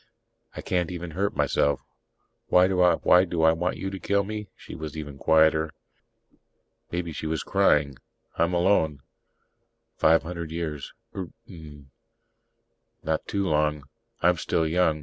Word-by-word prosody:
I - - -5
can't 90 -1 -1
even 90 -1 -6
hurt 100 +6 -2
myself. 70 0 +1 0.7
Why 90 0 +5
do 95 -1 +1
I 90 -1 +5
want 85 -1 +3
you 95 - -4
to 95 - -6
kill 100 +1 +1
me?" 105 0 -6
She - - -12
was 80 -1 -7
even 75 -3 -7
quieter. 80 0 +3 1.2
Maybe 85 -1 -3
she 80 - -5
was 80 -1 -2
crying. 70 -3 +2 0.4
"I'm 85 +2 +1
alone. 80 -6 +2 0.9
Five 80 +1 +4
hundred 85 -1 -6
years, 80 -3 -5 0.2
Eert 95 -3 -5 0.2
mn 75 - -13 1.1
not 80 0 -2
too 100 -1 -1
long. 75 -2 +1 0.4
I'm 90 +1 +4
still 80 0 0
young. 80 -1 +1
80 Hz, 135 wpm, -26 LUFS, 80-90 Hz, 1.2 s, Why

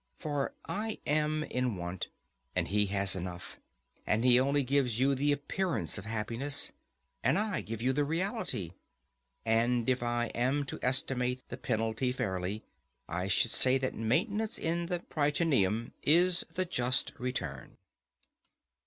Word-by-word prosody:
For 145 -4 -2
I 220 +1 -3
am 155 +1 +1
in 125 -7 -1
want, 90 +1 -4 0.5
and - - 0
he 105 +1 +2
has 100 -1 +2
enough; 90 -1 -6 0.5
and 110 +3 +2
he 125 -1 +7
only 140 +2 +2
gives 130 -3 +1
you 135 +2 +4
the 145 +2 +2
appearance 160 - 0
of 95 - -9
happiness, 115 +6 -3 0.5
and 130 +8 +3
I 210 -1 0
give 115 +1 -5
you 130 +1 +2
the 145 +2 +2
reality. 165 - -2 0.7
And 115 +1 +2
if 130 -1 +2
I 120 0 0
am 135 +4 +1
to - - -6
estimate 125 0 +1
the 125 - -5
penalty 115 0 0
fairly, 100 -4 -2 0.4
I 90 +3 -2
should 105 +4 +2
say 130 +1 +5
that 130 -1 -2
maintenance 200 - 0
in 170 +1 0
the 175 -1 -1
Prytaneum 145 - +1
is 175 +4 +4
the 185 - +3
just 125 -7 +1
return. 100 - -4
125 Hz, 145 wpm, -31 LUFS, 110-150 Hz, 0.7 s, he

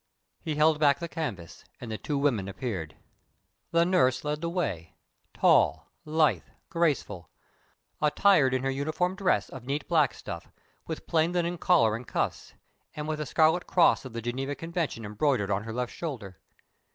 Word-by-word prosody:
He 155 -3 -3
held 155 0 +3
back 145 -2 +4
the 170 - -5
canvas, 100 - -6 0.2
and 120 -3 -7
the 110 - -3
two 145 - -2
women 130 -9 +1
appeared. 100 - -5 0.7
The 170 0 +3
nurse 130 -9 +2
led 150 +1 -2
the 170 - -2
way 120 - -3 0.4
tall, 80 +1 +3
lithe, 155 -1 +2 0.3
graceful 135 - -1 0.7
attired 150 -3 +4
in 130 - -1
her 135 - 0
uniform 155 +7 -1
dress 195 -2 +1
of 130 -3 -9
neat 145 +2 -2
black 155 -5 +2
stuff, - - -8 0.4
with - - -5
plain 165 +1 +1
linen 175 -1 -1
collar 135 -14 +4
and 115 +2 -8
cuffs, - - -3 0.4
and 150 0 -5
with 155 -1 -2
the 150 - -3
scarlet 160 +2 +3
cross 175 - +4
of 130 -4 -9
the 115 -1 -5
Geneva 135 +4 -3
Convention 165 -9 -3
embroidered 105 -1 0
on 100 +2 -1
her 115 - -5
left 125 +1 -3
shoulder. 115 - -6
145 Hz, 165 wpm, -28 LUFS, 115-165 Hz, 0.7 s, back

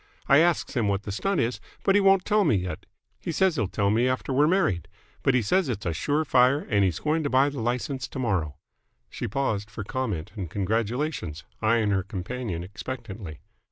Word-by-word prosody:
I 140 - +7
asks 170 0 +2
him 120 -6 +1
what 100 0 0
the 105 - -5
stunt 195 - 0
is, 120 +2 -1 0.2
but 195 - +4
he 205 - +5
won't 195 -1 +4
tell 210 0 +3
me 115 - +3
yet. 90 -1 -4 0.3
He - - -4
says 185 +1 +2
he'll 110 -8 0
tell 100 +1 0
me 115 +4 +3
after 130 +1 -1
we're 145 +3 +4
married, 165 - +1 0.3
but 135 - +3
he 125 - +3
says 185 - +2
it's 105 -5 -3
sure 145 - 0
fire 130 0 +4
and 100 -1 +4
he's 90 -4 +1
going 155 +2 0
to 145 - -1
buy 135 +2 +4
the 140 -2 -6
license 125 +2 -2
tomorrow." 95 - -1 0.6
She - - -4
paused 105 -4 -1
for 110 -2 -6
comment 105 -7 -3
and 95 -6 -5
congratulations, 105 - -2 0.2
eyeing 110 -1 +2
her 95 -1 +2
companion 100 -1 -4
expectantly. 100 - -7
120 Hz, 195 wpm, -26 LUFS, 100-140 Hz, 0.6 s, I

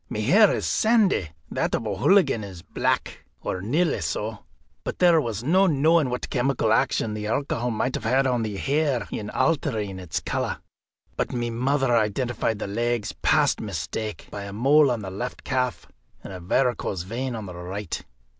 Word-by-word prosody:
My - - -4
hair 200 - +6
is - - -1
sandy, 215 - +2 0.2
that - - 0
of - - -3
O'Hooligan 110 - +3
is 95 -4 -9
black, - - -1 0.2
or 90 - -3
nearly 150 - +1
so; 110 0 -3 0.4
but - - -4
there 175 -3 +5
was 115 -4 -4
no 185 +8 +4
knowing 155 -1 +3
what 125 0 -4
chemical 125 -3 +1
action 110 -1 +1
the 105 0 -4
alcohol 125 0 -1
might 125 +3 -1
have 130 +5 +1
on 125 -2 +1
the 105 -3 -3
hair 140 -2 0
in 105 -1 -4
altering 110 - 0
its 90 -3 -3
colour. - - -2 0.6
But - - -1
my 120 -1 -2
mother 130 +1 +1
identified 115 +1 0
the - - -4
legs 120 +2 -1
past - - +3
mistake, 110 -2 -4
by 100 -1 -6
a 100 - -7
mole 140 +6 +5
on 120 -4 -1
the 95 - -5
left 120 +7 -5
calf 125 -3 -1 0.4
and - - -8
a 95 - -7
varicose 100 -1 0
vein 120 +6 -3
on 110 -2 -5
the 90 - -8
right. 90 +2 -5
120 Hz, 175 wpm, -25 LUFS, 105-135 Hz, 0.6 s, hair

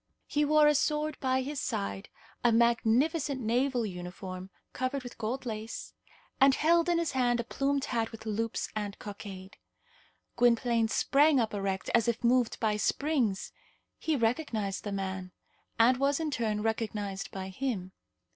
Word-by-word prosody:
He 295 - 0
wore 305 +1 +5
a 300 - +5
sword 300 +1 0
by 260 -1 +1
his 285 +1 -4
side, 100 -1 -3 0.3
a 240 - +5
magnificent 240 +6 +2
naval 245 +1 +1
uniform, 185 0 -7 0.2
covered 255 +1 -2
with 245 - -10
gold 240 +4 -3
lace, 220 -1 -5 0.5
and 270 0 +6
held 335 +2 +3
in 345 - +3
his 335 -2 0
hand 245 -2 +2
a - - 0
plumed 275 +3 -1
hat 230 -2 -1
with 225 -1 -10
loops 225 +1 -2
and 205 -1 -3
cockade. 195 -2 -9 0.8
Gwynplaine 235 -1 +3
sprang 280 +5 +4
up 225 -3 0
erect 195 -1 -2
as 235 -1 +4
if 235 0 -1
moved 240 -1 +2
by 215 -2 +1
springs. 250 -5 0 0.5
He 320 - 0
recognized 225 -5 -1
the 205 - -3
man, 190 -2 -4 0.4
and 245 +3 +5
was, 275 +2 +1
in 315 -2 -2
turn, 220 -5 -1
recognized 210 -3 -2
by 190 0 -6
him. 190 -3 -3
235 Hz, 155 wpm, -30 LUFS, 210-275 Hz, 0.8 s, and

